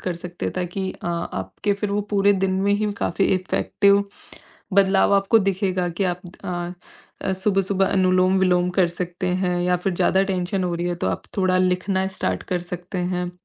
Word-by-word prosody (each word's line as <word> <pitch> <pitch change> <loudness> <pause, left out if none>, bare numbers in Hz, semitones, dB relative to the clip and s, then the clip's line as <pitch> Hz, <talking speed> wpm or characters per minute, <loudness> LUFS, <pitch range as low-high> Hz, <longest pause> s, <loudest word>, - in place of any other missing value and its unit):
कर 180 -2 -3
सकते 175 0 -6
हैं - - -2
ताकि 185 +1 -3
अ, - - -10
आपके 170 +4 -2
फिर 200 0 -3
वो 205 - +1
पूरे 200 0 +5
दिन 190 - +1
में 200 0 +2
ही 210 0 0
काफ़ी 190 +3 0
इफेक्टिव 200 +2 +2 0.7
बदलाव 195 0 +4
आपको 200 +3 +4
दिखेगा 190 -2 0
कि 195 - +3
आप 180 -1 -1 0.2
अ, 175 +2 -6
सुबह-सुबह 195 0 +1
अनुलोम-विलोम 185 -1 +3
कर 175 -2 +5
सकते 175 +1 -4 0.2
हैं 180 -1 0
या 180 0 +2
फिर 185 +1 -2
ज़्यादा 190 +2 +3
टेंशन 185 0 -1
हो 175 -1 -1
रही 175 +1 -2
है 175 - -1
तो - - +2
आप - - -3 0.2
थोड़ा 185 -1 +3
लिखना 185 +1 +1
स्टार्ट 95 0 -1
कर 175 - 0
सकते 180 +2 -5 0.2
हैं 180 0 -2
185 Hz, 180 wpm, -22 LUFS, 180-195 Hz, 0.7 s, पूरे